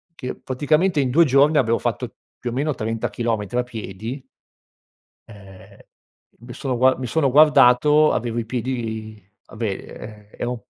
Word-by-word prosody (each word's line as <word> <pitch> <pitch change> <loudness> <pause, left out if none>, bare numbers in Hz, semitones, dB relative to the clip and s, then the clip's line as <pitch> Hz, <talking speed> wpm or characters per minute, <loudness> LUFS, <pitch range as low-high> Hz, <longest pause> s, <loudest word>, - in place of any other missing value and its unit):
che 130 -5 -6
praticamente 155 +6 0
in 130 -2 +1
2 170 +5 +5
giorni 145 +2 +4
avevo 115 -4 +2
fatto - - -3 0.2
più 120 -1 -4
o - - -6
meno 145 +3 -1
30 110 0 -3
chilometri 115 -1 -3
a 125 - +2
piedi 115 +2 -7 1.0
Ehm, 100 -3 -15 0.6
mi 120 +1 -11
sono 130 -2 -3
gua 130 +2 +4
mi 130 - -4
sono 140 +1 +1
guardato 150 +1 +5
avevo 120 0 -2
i 115 - -2
piedi, 110 -3 -4 0.2
vabbè 110 +1 -5
e 105 +2 -10
ero 120 0 -4
125 Hz, 150 wpm, -21 LUFS, 110-140 Hz, 1.0 s, 2